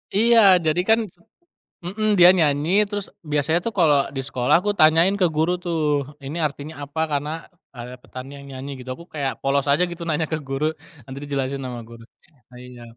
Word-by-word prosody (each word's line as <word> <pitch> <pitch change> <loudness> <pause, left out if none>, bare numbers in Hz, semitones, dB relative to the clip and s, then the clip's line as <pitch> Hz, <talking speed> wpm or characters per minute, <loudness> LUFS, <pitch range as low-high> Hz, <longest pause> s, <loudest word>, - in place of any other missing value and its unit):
Iya 220 -3 +6
jadi 160 +3 +2
kan 225 +1 +5 0.8
mhm 210 +5 -1
dia 175 0 +9
nyanyi, 160 +6 +2
terus 205 -1 -3 0.2
biasanya 150 +3 +1
tuh 230 - -2
kalo 145 -5 +3
di - - -1
sekolah 125 -2 0
aku 205 +2 -1
tanyain 165 +5 +5
ke 190 - +1
guru 165 +3 +1
tuh, 170 -2 -2 0.4
ini 140 +4 -7
artinya 150 +2 -7
apa, 150 +3 -6
karena 145 0 -2 0.4
ada 125 -1 -9
petani 135 +2 -10
yang 140 0 -12
nyanyi 130 +2 -7
gitu, 130 - -9
aku 170 - -13
kayak 140 -3 -4
polos 140 0 +1
aja 165 +5 +3
gitu 175 -1 -8
nanya 160 -1 -1
ke 155 - -1
guru, 140 +3 -2 0.3
nanti 135 0 -8
dijelasin 135 -1 -3
sama 125 -2 -6
guru, 115 0 -13 0.5
nah 125 - -13
iya. 125 -1 -12
150 Hz, 185 wpm, -22 LUFS, 135-175 Hz, 0.8 s, dia